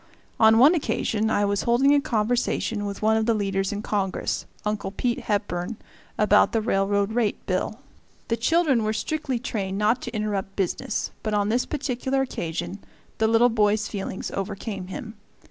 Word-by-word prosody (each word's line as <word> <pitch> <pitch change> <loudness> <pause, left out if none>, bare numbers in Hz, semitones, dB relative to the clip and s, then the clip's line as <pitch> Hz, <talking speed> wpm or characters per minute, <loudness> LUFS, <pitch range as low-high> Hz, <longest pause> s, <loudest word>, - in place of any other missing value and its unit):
On 220 0 +6
one 275 +8 +7
occasion 220 -9 0
I 205 -2 +2
was 200 0 0
holding 255 +4 +4
a 290 - +4
conversation 220 -2 0
with 200 +1 -6
one 220 +1 +4
of 220 0 0
the 230 - +3
leaders 195 -2 -1
in 205 0 -4
Congress, 195 -3 -2 0.2
Uncle 210 -2 -1
Pete 240 +4 -1
Hepburn, 205 -1 -2 0.4
about 210 0 +4
the 225 - +3
Railroad 200 0 +1
Rate 225 -3 0
Bill. 190 +4 -2 0.5
The 230 - +1
children 270 0 +2
were 215 0 0
strictly 265 +4 -2
trained 200 -6 -3
not 215 +4 +2
to 240 -1 -6
interrupt 200 -2 -2
business, 195 +2 -2
but 215 -1 -1
on 205 0 +1
this 240 +3 +1
particular 270 -2 -1
occasion 175 -4 -4 0.4
the 220 - +3
little 230 +2 +5
boy's 215 -1 +2
feelings 195 -2 -5
overcame 195 -1 -4
him. 220 +3 -7
215 Hz, 165 wpm, -25 LUFS, 200-235 Hz, 0.5 s, one